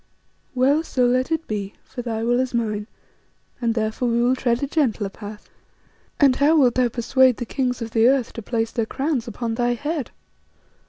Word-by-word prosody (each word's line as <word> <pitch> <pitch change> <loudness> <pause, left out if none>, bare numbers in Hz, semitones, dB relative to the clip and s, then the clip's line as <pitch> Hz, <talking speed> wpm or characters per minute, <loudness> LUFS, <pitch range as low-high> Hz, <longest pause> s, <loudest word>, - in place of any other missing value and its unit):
Well, 275 +5 +3
so 255 -6 0
let 255 +4 +1
it 325 0 -1
be, 205 -2 -4
for 245 - -7
thy 225 -2 -3
will 240 +1 +2
is 255 -1 -1
mine, 215 -3 -1 0.7
and 230 -1 0
therefore 220 +2 -1
we 235 0 +1
will 250 +2 +3
tread 240 0 0
a - - 0
gentler 245 -9 0
path." 210 +1 -10 0.7
"And 275 -3 +5
how 300 +3 +4
wilt 255 -5 +4
thou 250 -1 +2
persuade 250 +1 +3
the 240 - -4
kings 250 -1 -2
of 225 - -7
the 225 +1 +4
earth 260 -2 +2
to 230 - -6
place 225 +1 -2
their 230 -2 -1
crowns 270 -3 -2
upon 230 +1 -3
thy 240 +1 0
head?" 290 +2 -3
245 Hz, 195 wpm, -22 LUFS, 225-260 Hz, 0.7 s, And